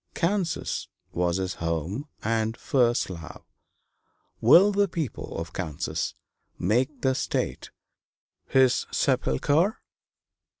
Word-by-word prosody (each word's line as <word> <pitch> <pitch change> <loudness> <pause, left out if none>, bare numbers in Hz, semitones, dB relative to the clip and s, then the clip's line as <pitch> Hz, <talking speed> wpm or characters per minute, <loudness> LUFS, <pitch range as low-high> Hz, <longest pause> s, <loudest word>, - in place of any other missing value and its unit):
Kansas 180 -1 -1 0.2
was 85 0 0
his 95 -1 -2
home 85 - -2 0.2
and 110 0 0
first 120 -3 +2
love; 85 -3 -9 1.0
will 200 +4 +7
the 200 0 +2
people 165 - -4
of 80 +1 -5
Kansas 80 -6 -3 0.4
make 125 - 0
the 130 -1 +2
state 65 - -2 0.8
his 130 -2 +3
sepulchre? 155 - +1
120 Hz, 95 wpm, -26 LUFS, -, 1.0 s, will